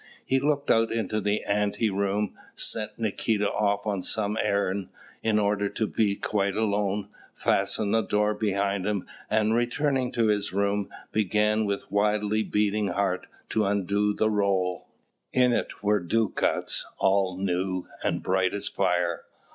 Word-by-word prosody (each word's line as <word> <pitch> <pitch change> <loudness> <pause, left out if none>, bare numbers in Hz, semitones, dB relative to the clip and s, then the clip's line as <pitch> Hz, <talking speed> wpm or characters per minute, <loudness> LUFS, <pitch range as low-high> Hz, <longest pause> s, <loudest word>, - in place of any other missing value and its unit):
He 135 - +2
looked 145 0 +1
out 115 0 +3
into 110 -1 -1
the 105 +1 0
ante 105 +1 0
room, 100 +1 0 0.2
sent 110 -1 0
Nikita 110 -1 0
off 100 0 0
on 100 -3 -1
some 105 +2 -1
errand, 100 -2 0 0.3
in 110 -1 +2
order 100 -1 +1
to 110 - -1
be 105 -1 +1
quite 100 -1 -1
alone, 105 -2 0 0.3
fastened 105 -2 0
the 115 - +4
door 105 0 +1
behind 100 -2 0
him, 105 -3 -1 0.2
and, 110 0 +2
returning 125 +2 +1
to 115 - +2
his 105 -1 +1
room, 100 +1 0 0.2
began 105 +1 +2
with 100 0 -3
wildly 105 +1 +1
beating 105 0 +1
heart 95 0 -1 0.2
to 110 - +1
undo 100 +1 +1
the 110 0 +2
roll. 95 -3 0 0.5
In 125 -1 +4
it - - -3
were 105 0 +3
ducats, 105 +4 0
all 95 -1 +2
new, 95 -1 -1 0.2
and - - -1
bright 95 +1 +1
as 100 0 -3
fire. 90 -3 0
105 Hz, 145 wpm, -27 LUFS, 100-110 Hz, 0.5 s, the